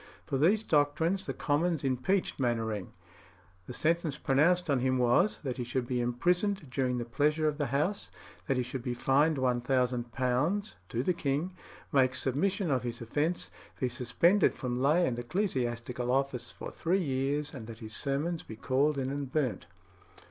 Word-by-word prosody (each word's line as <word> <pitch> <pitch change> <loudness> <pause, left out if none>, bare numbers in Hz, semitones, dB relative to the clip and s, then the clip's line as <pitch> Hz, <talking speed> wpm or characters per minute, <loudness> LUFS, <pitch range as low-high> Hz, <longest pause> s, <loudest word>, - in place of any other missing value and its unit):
For 135 - -1
these 200 +9 +4
doctrines 160 +4 +1
the - - -2
Commons 160 +1 0
impeached 135 +10 0
Mainwaring; 110 -6 -1 0.8
the - - -6
sentence 165 +2 0
pronounced 170 +6 +3
on 140 -4 +2
him 130 +1 +1
was, 125 - +3
that 130 -3 -3
he 125 - -2
should 120 +1 -2
be 125 0 -1
imprisoned 175 - 0
during 125 -1 0
the 120 - -3
pleasure 150 +6 +1
of 150 0 -1
the 145 - 0
House, 150 - -1 0.4
that 135 -4 +1
he 125 - +1
should 125 +1 -5
be 125 0 -3
fined 145 +5 +3
£1000, 125 - 0
to 120 +2 -1
the 180 - +2
king, 155 +3 -1 0.4
make 130 -3 +3
submission 185 - 0
of 130 -2 +2
his 120 -1 -5
offence, 150 +9 -1 0.3
be 130 - +1
suspended 130 - +3
from 125 -1 -3
lay 155 +7 +4
and 120 -5 -1
ecclesiastical 120 - -2
office 135 -1 0
for - - -8
three 185 +3 0
years, 140 +1 -1
and 115 -5 -8
that 115 -1 -8
his 110 -2 -7
sermons 155 +5 -1
be 110 - -9
called 140 +6 +1
in 135 0 -1
and 140 -2 -4
burnt. 140 -6 -1
135 Hz, 170 wpm, -30 LUFS, 125-160 Hz, 0.8 s, these